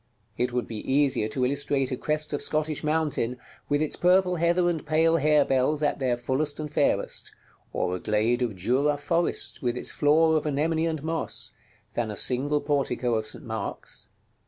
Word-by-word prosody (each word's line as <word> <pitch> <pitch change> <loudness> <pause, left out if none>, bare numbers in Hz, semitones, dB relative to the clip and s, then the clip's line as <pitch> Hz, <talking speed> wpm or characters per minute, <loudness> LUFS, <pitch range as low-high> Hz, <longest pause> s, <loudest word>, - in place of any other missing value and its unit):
It 125 +1 -1
would 125 0 -2
be 110 +2 -5
easier 135 -5 +3
to 125 +4 -1
illustrate 140 0 -1
a - - 0
crest 150 +3 -2
of 145 - -1
Scottish 155 -1 -1
mountain, 150 -6 0 0.3
with 145 +1 +2
its 155 - 0
purple 180 0 +3
heather 170 +2 +2
and 165 -3 -1
pale 160 +2 +3
harebells 150 -1 +2
at 145 - 0
their 125 -3 +1
fullest 140 +5 -2
and 150 -1 -5
fairest, - - 0 0.4
or 90 - -1
a - - -5
glade 110 +5 +1
of 115 -5 -1
Jura 130 +10 +1
forest, 170 +4 -1
with 125 -2 -1
its - - +2
floor 160 +2 +3
of 155 - -2
anemone 160 +3 0
and 160 -3 -3
moss, 160 -1 -3 0.4
than 120 -2 -1
a 105 - -4
single 140 +6 +1
portico 135 -4 0
of 110 -1 -1
St. 150 - -5
Mark's. 110 -3 -5
145 Hz, 180 wpm, -26 LUFS, 125-155 Hz, 0.4 s, easier